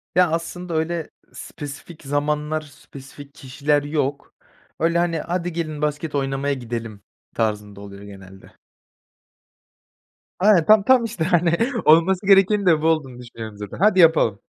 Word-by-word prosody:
Ya, 180 -2 +4
aslında 170 +1 -4
öyle 160 0 -2 0.2
spesifik 145 +3 -10
zamanlar, 150 +2 -2
spesifik 140 -1 -14
kişiler 145 +2 -1
yok. 145 -1 -3 0.4
Öyle, 165 +1 +1
hani, 170 -1 0
"Hadi 175 +1 -3
gelin, 155 -3 -4
basket 150 0 -3
oynamaya 135 0 -1
gidelim." 115 -5 -6 0.3
tarzında 105 -2 -3
oluyor 100 -1 -11
genelde. 95 -1 -14 1.8
Aynen, 190 -4 +4
tam 215 -1 +5
tam, 255 +2 +4
işte, 215 -7 -4
hani, 170 0 +2 0.3
olması 175 +5 +4
gerekenin 195 +1 +4
de 165 -4 +3
bu 160 - +1
olduğunu 150 -6 -1
düşünüyorum 115 -3 -10
zaten: 105 -1 -8
"Haydi 195 0 +3
yapalım." 160 - +4
150 Hz, 130 wpm, -21 LUFS, 135-170 Hz, 1.8 s, tam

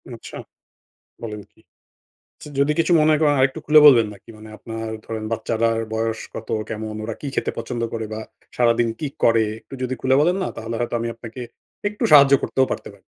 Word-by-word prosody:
আচ্ছা - - -10 0.9
বলেন 105 -2 -6
কি? - - -26 0.8
আচ্ছা 150 - -12
যদি 140 +2 +3
কিছু 170 - +2
মনে 155 0 +4
করেন 145 -2 +3
আরেকটু 130 0 +2
খুলে 150 +1 +7
বলবেন 120 -7 +7
নাকি? 100 - -18
মানে 110 0 -12
আপনার 115 -1 -6 0.2
ধরেন 110 -1 -5
বাচ্চারার 115 0 0
বয়স 110 0 -1
কত, 110 - -8 0.2
কেমন? 110 0 -5
ওরা 110 0 -4
কি 145 - -5
খেতে - - -1
পছন্দ 115 +1 -4
করে 115 -1 -3
বা 110 - -4 0.4
সারাদিন 120 -1 +3
কি 150 - -2 0.2
করে 115 -1 +5 0.2
একটু - - -16
যদি 130 +1 -2
খুলে 130 0 +3
বলেন 175 +4 +3
না, - - -2
তাহলে 115 +1 -5
হয়তো 120 0 -2
আমি 115 - -2
আপনাকে 115 +1 -10 0.5
একটু 210 0 -4
সাহায্য 140 -1 +8
করতেও 130 0 +2
পারতে - - -4
পারি। - - -21
115 Hz, 190 wpm, -22 LUFS, 110-135 Hz, 0.9 s, সাহায্য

